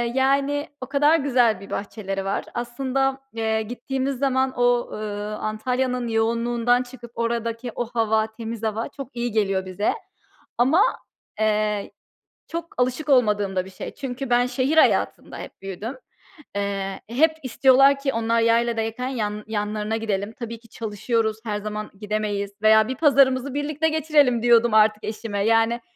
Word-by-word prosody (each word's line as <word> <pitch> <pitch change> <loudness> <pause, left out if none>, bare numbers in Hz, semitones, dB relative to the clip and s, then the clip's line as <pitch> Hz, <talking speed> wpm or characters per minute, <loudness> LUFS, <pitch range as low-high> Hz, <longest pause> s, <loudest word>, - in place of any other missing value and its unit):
yani 280 +2 +1
o 260 - -3
kadar 290 +3 +4
güzel 245 -7 +2
bir 200 - -12
bahçeleri 195 -1 -4
var. 195 - -2
Aslında, 265 +3 -1 0.2
eee, 220 -1 0
gittiğimiz 260 +4 -3
zaman 265 -1 +1
o, 245 0 +2
ııı, 210 0 -4
Antalya'nın 250 +3 -1
yoğunluğundan 235 +2 +1
çıkıp 245 -2 -12
oradaki 235 +1 -2
o 240 - -1
hava, 220 -1 +2
temiz 225 0 -7
hava 220 +1 -1
çok 275 -3 -10
iyi 240 0 -2
geliyor 195 -3 0
bize 185 +3 -1 0.6
ama, 270 +10 +4 0.6
eee, 210 -1 0 0.6
çok 335 0 -6
alışık 255 +5 -1
olmadığım 210 -7 +3
da 185 0 0
bir 190 - -10
şey. 185 - -8
Çünkü 265 0 -5
ben 245 0 +4
şehir 265 +4 0
hayatında - - +2
hep - - -10
büyüdüm. 205 +7 -6 0.6
Eee, 195 -1 -3
hep 315 +6 +3
istiyorlar 270 +2 +5
ki 275 -1 -1
onlar 230 0 +1
yayladayken 230 +1 +1
yan 210 -4 -3
yanlarına 210 0 -2
gidelim. 210 -1 -2
Tabii 230 -1 -6
ki 230 -1 -21
çalışıyoruz, 220 0 -1
her 210 -1 -1
zaman 210 0 -5
gidemeyiz 210 -1 -2
veya 220 0 +5
"Bir 260 - -3
pazarımızı 270 -2 +3
birlikte 300 +2 0
geçirelim." 295 -6 +2
diyordum 235 -1 +5
artık 215 0 +4
eşime. 210 -2 -3
Yani, 225 +1 +3
230 Hz, 145 wpm, -23 LUFS, 215-260 Hz, 0.6 s, istiyorlar